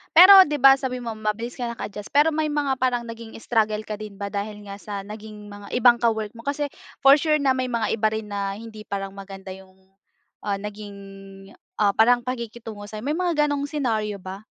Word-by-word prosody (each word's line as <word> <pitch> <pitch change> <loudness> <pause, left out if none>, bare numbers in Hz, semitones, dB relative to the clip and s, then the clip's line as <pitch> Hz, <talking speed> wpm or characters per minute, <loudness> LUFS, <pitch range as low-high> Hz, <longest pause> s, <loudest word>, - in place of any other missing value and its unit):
Pero 380 +2 +10
'di 295 - -1
ba 270 0 +8
sabi 255 -2 -4
mo 230 - -4
mabilis 215 +3 -4
kang 235 -1 -3
naka-adjust, 210 -2 -7
pero 295 +3 +3
may 310 0 0
mga 290 -3 -1
parang 250 -2 +1
naging 230 -1 -9
struggle 215 -2 0
ka 210 -1 -6
din 210 -2 -8
ba 200 0 -5
dahil 210 0 -5
nga 200 0 -9
sa 200 -1 -6
naging 210 0 -10
mga 205 0 -8
ibang 245 -1 +5
mga - - -12
ka-work 220 -2 -1
mo? 230 - -12
Kasi, 285 0 -2 0.3
for 275 +2 +8
sure, 310 0 +2
na 285 -3 +2
may 255 -1 -1
mga 235 -3 -1
iba 220 -1 +1
rin 220 0 -3
na 200 -1 -2
hindi 215 0 -11
parang 195 -1 -4
maganda 195 -1 -10
yung, 190 0 -13 0.6
ah, 205 -1 -2
naging, 205 0 -8 0.8
ah, 205 -1 +3
parang 240 +4 +4
pakikitungo 235 -4 -6
sa'yo? 215 +1 -8
May 295 +4 -1
mga 335 -5 +1
ganong 285 -1 -2
senaryo 225 -8 -1
ba? 190 +2 -8
220 Hz, 205 wpm, -24 LUFS, 205-260 Hz, 0.8 s, Pero